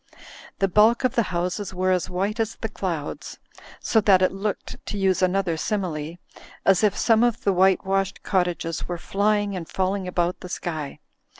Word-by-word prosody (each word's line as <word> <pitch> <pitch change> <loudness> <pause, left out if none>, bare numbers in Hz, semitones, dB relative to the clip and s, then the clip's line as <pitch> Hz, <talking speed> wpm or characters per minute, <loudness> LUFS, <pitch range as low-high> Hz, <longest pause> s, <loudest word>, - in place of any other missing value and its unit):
The 195 - +2
bulk 215 +6 +4
of 255 - +2
the 235 - +3
houses 180 +2 -3
were 185 +1 +1
as 185 0 0
white 195 +5 -2
as 225 0 -1
the 225 - -5
clouds, 170 -8 -5 0.4
so 220 - +2
that 190 -3 +5
it 185 - +3
looked 200 +1 -5
(to 205 - -3
use 190 -2 +1
another 185 -2 +1
simile) 165 -5 -3 0.5
as 195 +1 +4
if 205 -2 +2
some 225 -1 +4
of 240 -2 +1
the 200 - +2
whitewashed 190 +1 +1
cot 185 -3 +2
tages 165 -2 -4
were 175 - -3
flying 205 +2 0
and 170 -3 -6
falling 190 0 -1
about 175 0 -1
the 180 - -9
sky. 155 -5 -5
190 Hz, 180 wpm, -24 LUFS, 180-205 Hz, 0.5 s, that